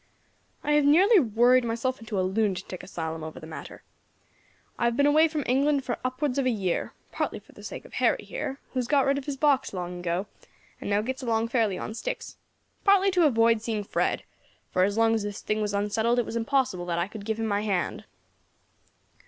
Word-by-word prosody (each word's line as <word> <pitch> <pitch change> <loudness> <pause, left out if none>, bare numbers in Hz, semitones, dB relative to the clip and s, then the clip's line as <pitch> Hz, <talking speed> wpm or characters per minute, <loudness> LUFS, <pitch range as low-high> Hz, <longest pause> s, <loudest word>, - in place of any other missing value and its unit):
"I 295 - 0
have 295 0 +4
nearly 370 +9 +6
worried 245 0 +4
myself 235 +3 -2
into 220 -3 -3
a 185 - +1
lunatic 190 -2 -1
asylum 160 -3 -5
over 155 0 -7
the - - -10
matter. 160 - -9 1.0
I - - +1
have 235 0 +1
been 285 - +4
away 305 +2 +5
from 305 -2 -3
England 275 +2 +2
for 245 - -3
upwards 255 +2 -1
of 265 - +1
a - - +4
year 195 -7 -1 0.2
partly - - -2
for - - -16
the - - -14
sake - - -7
of - - -15
Harry - - +1
here, 290 - -5
who 260 - -2
has 245 - -1
got 280 -1 +3
rid 275 +1 +2
of 270 - -10
his 280 -2 -3
box 280 -4 +2
long 180 0 -4
ago, 175 +2 -1 0.5
and - - -5
now 205 +1 +2
gets 260 +4 -4
along 230 -2 0
very 240 -1 +2
fairly 195 -3 -2
on 215 - -5
sticks, - - -5 0.5
partly 395 -1 +5
to 360 -3 +4
avoid 230 -3 +3
seeing 220 -2 -2
Fred, - - -1 0.5
for 185 - +3
as 205 +2 -2
long 225 0 +4
as 225 - +1
this 205 -1 -5
thing 215 0 -1
was 210 -1 -1
unsettled, 220 +4 +1
it 245 - +2
was - - -6
impossible 230 -7 0
that 170 -1 -1
I 170 +1 0
could 210 0 -9
give 220 +1 -2
him 225 - -1
my 205 -1 0
hand. 195 -7 -2
230 Hz, 220 wpm, -27 LUFS, 205-275 Hz, 1.0 s, nearly